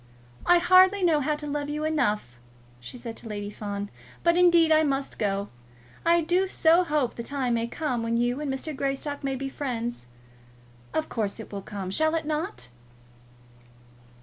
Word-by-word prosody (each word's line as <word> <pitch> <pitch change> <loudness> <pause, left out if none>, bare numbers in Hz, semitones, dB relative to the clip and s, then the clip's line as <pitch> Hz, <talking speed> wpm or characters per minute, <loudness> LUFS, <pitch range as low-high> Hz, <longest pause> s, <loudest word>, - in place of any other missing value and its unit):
"I 350 - +7
hardly 370 +3 +5
know 325 -4 +4
how 300 +2 0
to 295 0 -8
love 290 0 -3
you 300 +1 -3
enough," 215 - -1 0.4
she 125 - -9
said 235 -2 -7
to - - -9
Lady 205 -1 -5
Fawn, 205 -1 -5 0.3
"but 340 0 +4
indeed 345 -2 +5
I 310 0 +6
must 275 -2 -1
go. 200 -1 -1 0.5
I 335 0 +4
do 355 +4 +1
so 340 -1 +4
hope 300 -7 0
the - - -6
time 255 0 -2
may 230 0 0
come 250 -2 -2
when 230 0 0
you 245 +4 0
and 290 -2 -2
Mr. 270 +3 -4
Greystock 275 +2 -3
may 270 -1 -1
be 270 +1 -4
friends. 240 - -4 0.8
Of 315 - -1
course, 215 -2 -3
it 220 - -9
will 200 -1 -5
come. 195 -2 -6
Shall 315 +8 +2
it 320 - -2
not?" 300 - -3
275 Hz, 175 wpm, -26 LUFS, 230-315 Hz, 0.8 s, I